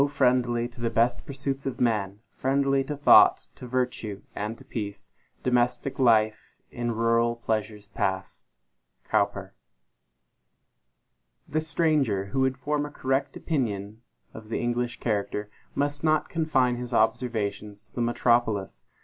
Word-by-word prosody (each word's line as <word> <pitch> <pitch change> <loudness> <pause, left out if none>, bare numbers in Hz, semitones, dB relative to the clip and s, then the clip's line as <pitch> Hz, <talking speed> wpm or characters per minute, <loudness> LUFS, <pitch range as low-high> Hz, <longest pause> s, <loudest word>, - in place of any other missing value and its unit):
friendly 125 -3 +2
to 120 0 -14
the 115 - +1
best 120 +2 +1
pursuits 135 0 -3
of 130 - -4
man, 105 -4 0
Friendly 135 0 +1
to 150 +1 -4
thought, 145 - +6
to 125 - -10
virtue 125 -5 -2
and 105 +3 -4
to 135 - -16
peace, 105 -6 -6 0.3
Domestic 125 +2 +1
life 110 -4 +2 0.2
in 120 0 -3
rural 115 +1 +2
pleasures 110 -2 -3
past! 95 0 -4 0.5
COWPER. - - 0 1.9
THE 155 - 0
stranger 150 - +1
who 135 - -1
would 130 0 +1
form 145 +3 -1
a - - -9
correct 135 -1 -1
opinion 110 -8 -2 0.3
of 110 -1 -11
the - - -1
English 120 0 -1
character, 105 -1 -2 0.2
must 145 +1 -1
not 155 -1 +2
confine 130 -7 +1
his 125 0 -4
observations 110 -2 -1
to - - -35
the 120 - -3
metropolis. 120 -4 +1
120 Hz, 130 wpm, -26 LUFS, 110-135 Hz, 1.9 s, thought